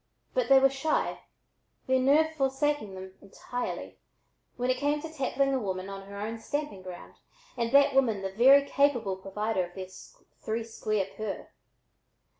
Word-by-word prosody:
But -, -, 0 dB
they 270 Hz, -, +8 dB
were 270 Hz, 0 st, +5 dB
shy, 275 Hz, +3 st, -1 dB, 0.7 s
their 260 Hz, 0 st, +2 dB
nerve 300 Hz, +5 st, +4 dB
forsaking 270 Hz, -6 st, 0 dB
them 190 Hz, 0 st, -9 dB
entirely, 245 Hz, +5 st, -6 dB, 0.6 s
when 250 Hz, +1 st, +1 dB
it 255 Hz, -, 0 dB
came 290 Hz, +2 st, +1 dB
to 320 Hz, +1 st, -8 dB
tackling 275 Hz, -1 st, 0 dB
a 265 Hz, -, +1 dB
woman 190 Hz, -3 st, -4 dB
on 195 Hz, 0 st, -8 dB
her 200 Hz, 0 st, -8 dB
own 225 Hz, +2 st, -4 dB
stamping 290 Hz, -4 st, -4 dB
ground, 185 Hz, -1 st, -10 dB, 0.4 s
and 235 Hz, -2 st, -1 dB
that 280 Hz, +1 st, +6 dB
woman 230 Hz, -7 st, +2 dB
the 190 Hz, -, -3 dB
very 270 Hz, +6 st, +6 dB
capable 245 Hz, -10 st, +2 dB
provider 195 Hz, +1 st, -2 dB
of 175 Hz, 0 st, -10 dB
their 185 Hz, -1 st, -6 dB, 0.5 s
"three 225 Hz, +1 st, -2 dB
square 215 Hz, -3 st, -2 dB
per." 215 Hz, -2 st, -5 dB
245 Hz, 160 wpm, -29 LUFS, 200-275 Hz, 0.7 s, they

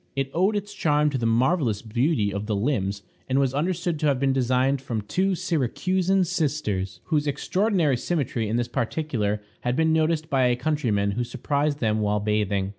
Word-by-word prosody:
It 135 Hz, -1 st, -2 dB
owed 190 Hz, +5 st, +2 dB
its 205 Hz, 0 st, -3 dB
charm 150 Hz, -5 st, +2 dB
to 135 Hz, -, -1 dB
the 115 Hz, -, 0 dB
marvelous 120 Hz, -, +1 dB
beauty 115 Hz, -2 st, 0 dB
of 100 Hz, +1 st, -4 dB
the 110 Hz, -, 0 dB
limbs, 100 Hz, -3 st, -1 dB, 0.3 s
and 130 Hz, -, +2 dB
was 135 Hz, -2 st, +2 dB
understood 170 Hz, +2 st, -1 dB
to 150 Hz, -, +1 dB
have 140 Hz, -3 st, +2 dB
been 135 Hz, 0 st, +2 dB
designed 130 Hz, +1 st, +1 dB
from 115 Hz, -5 st, -3 dB
two 190 Hz, -, 0 dB
Syracusan 185 Hz, +6 st, +1 dB
sisters, 145 Hz, -, -2 dB
whose 150 Hz, -2 st, 0 dB
extraordinary 180 Hz, -, +1 dB
symmetry 120 Hz, -7 st, -2 dB
in 110 Hz, -, 0 dB
this 120 Hz, 0 st, 0 dB
particular 115 Hz, -4 st, -2 dB, 0.2 s
had 125 Hz, 0 st, -1 dB
been 160 Hz, +2 st, +2 dB
noticed 160 Hz, 0 st, +1 dB
by 135 Hz, -4 st, +2 dB
a 125 Hz, -, +2 dB
countryman 120 Hz, -8 st, 0 dB
who 120 Hz, +5 st, -1 dB
surprised 140 Hz, +4 st, -1 dB
them 110 Hz, -2 st, +1 dB
while 105 Hz, 0 st, +1 dB
bathing. 105 Hz, -2 st, 0 dB
135 Hz, 185 wpm, -25 LUFS, 110-160 Hz, 0.3 s, owed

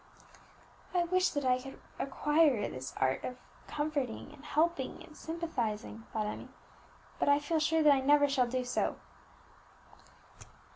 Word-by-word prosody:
"I 350 Hz, -, +4 dB
wish 370 Hz, +2 st, +2 dB
that 285 Hz, -2 st, -2 dB
I 255 Hz, 0 st, +3 dB
could 270 Hz, +1 st, -10 dB, 0.2 s
acquire 290 Hz, -4 st, +2 dB
this 130 Hz, +1 st, -6 dB
art 130 Hz, 0 st, +1 dB
of 250 Hz, -, -4 dB, 0.3 s
comforting 295 Hz, -5 st, -2 dB
and 290 Hz, -, -15 dB
helping 305 Hz, -2 st, 0 dB
and 310 Hz, -, -15 dB
sympathizing," 240 Hz, -11 st, -4 dB
thought 215 Hz, -1 st, -1 dB
Emmie; 210 Hz, -, -5 dB, 0.7 s
"but -, -, +2 dB
I 285 Hz, -, +6 dB
feel 315 Hz, +2 st, 0 dB
sure 320 Hz, +1 st, +2 dB
that 295 Hz, -1 st, +8 dB
I 275 Hz, -, +2 dB
never 290 Hz, +2 st, +5 dB
shall 265 Hz, -3 st, +2 dB
do 255 Hz, +1 st, -1 dB
so." 245 Hz, -, 0 dB
285 Hz, 145 wpm, -32 LUFS, 250-310 Hz, 0.7 s, that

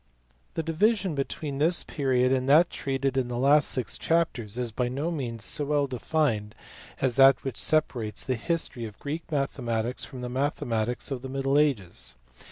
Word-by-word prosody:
THE 165 Hz, -, -1 dB
division 190 Hz, +3 st, +1 dB
between 140 Hz, 0 st, -3 dB
this 170 Hz, +4 st, +3 dB
period 130 Hz, -3 st, +1 dB
and 130 Hz, 0 st, 0 dB
that 160 Hz, +5 st, +6 dB
treated 135 Hz, -1 st, -1 dB
in 130 Hz, -2 st, +1 dB
the 120 Hz, -1 st, -3 dB
last 145 Hz, +4 st, +4 dB
six 125 Hz, -4 st, -3 dB
chapters 125 Hz, -10 st, 0 dB
is 125 Hz, -2 st, -2 dB
by 125 Hz, +3 st, -1 dB
no 145 Hz, +7 st, -2 dB
means 120 Hz, -9 st, -4 dB
so 150 Hz, -, -1 dB
well 145 Hz, 0 st, +2 dB
defined 125 Hz, -5 st, -1 dB, 0.4 s
as 130 Hz, -2 st, 0 dB
that 135 Hz, 0 st, +7 dB
which 135 Hz, -3 st, -3 dB
separates 120 Hz, -9 st, 0 dB
the 130 Hz, -, 0 dB
history 125 Hz, -2 st, -2 dB
of 105 Hz, -1 st, -9 dB
Greek 155 Hz, +3 st, -5 dB
mathematics 125 Hz, -4 st, -1 dB
from 130 Hz, -3 st, -8 dB
the 125 Hz, -, -3 dB
mathe 140 Hz, +4 st, -1 dB
matics 120 Hz, +3 st, -1 dB
of 130 Hz, -2 st, -3 dB
the 130 Hz, -, -7 dB
middle 135 Hz, 0 st, -1 dB
agea. 100 Hz, -, +1 dB
135 Hz, 175 wpm, -27 LUFS, 120-150 Hz, 0.4 s, that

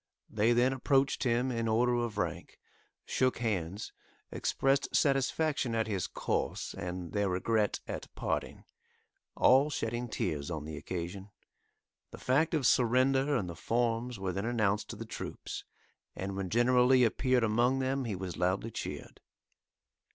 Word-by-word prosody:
They 110 Hz, +2 st, +2 dB
then 120 Hz, +2 st, +3 dB
approached 135 Hz, +1 st, +1 dB
him 125 Hz, +2 st, +1 dB
in 115 Hz, -1 st, -1 dB
order 120 Hz, +3 st, +2 dB
of 120 Hz, -3 st, -1 dB
rank, 105 Hz, -, -3 dB, 0.5 s
shook 130 Hz, 0 st, +1 dB
hands, 100 Hz, -3 st, -3 dB, 0.4 s
expressed 135 Hz, +1 st, 0 dB
satisfaction 135 Hz, -2 st, +1 dB
at 110 Hz, -1 st, +1 dB
his 100 Hz, -5 st, -2 dB
course -, -, -2 dB
and 90 Hz, -1 st, -5 dB
their 100 Hz, -2 st, +1 dB
regret 105 Hz, +3 st, 0 dB
at -, -, -5 dB
parting, -, -, -3 dB, 0.7 s
all 135 Hz, +3 st, +5 dB
shedding 120 Hz, -3 st, -3 dB
tears 75 Hz, -7 st, -2 dB
on 80 Hz, -3 st, -4 dB
the 80 Hz, 0 st, -6 dB
occasion. 90 Hz, +5 st, -5 dB, 0.8 s
The -, -, -10 dB
fact 155 Hz, +6 st, +1 dB
of 145 Hz, -5 st, 0 dB
surrender 130 Hz, +4 st, +3 dB
and 100 Hz, -8 st, -1 dB
the 85 Hz, -, -6 dB
forms 115 Hz, +4 st, -1 dB
were 95 Hz, -1 st, -3 dB
then 100 Hz, +3 st, -2 dB
announced 110 Hz, -3 st, 0 dB
to -, -, -5 dB
the -, -, -7 dB
troops, -, -, -6 dB, 0.5 s
and 95 Hz, +1 st, -4 dB
when 95 Hz, -1 st, -3 dB
General 125 Hz, +3 st, +4 dB
Lee 130 Hz, -1 st, +5 dB
appeared 125 Hz, +2 st, +2 dB
among 120 Hz, +4 st, +2 dB
them 135 Hz, 0 st, -1 dB
he 110 Hz, -4 st, -2 dB
was 90 Hz, -1 st, -5 dB
loudly 95 Hz, +5 st, 0 dB
cheered. -, -, -7 dB
115 Hz, 150 wpm, -31 LUFS, 100-130 Hz, 0.8 s, all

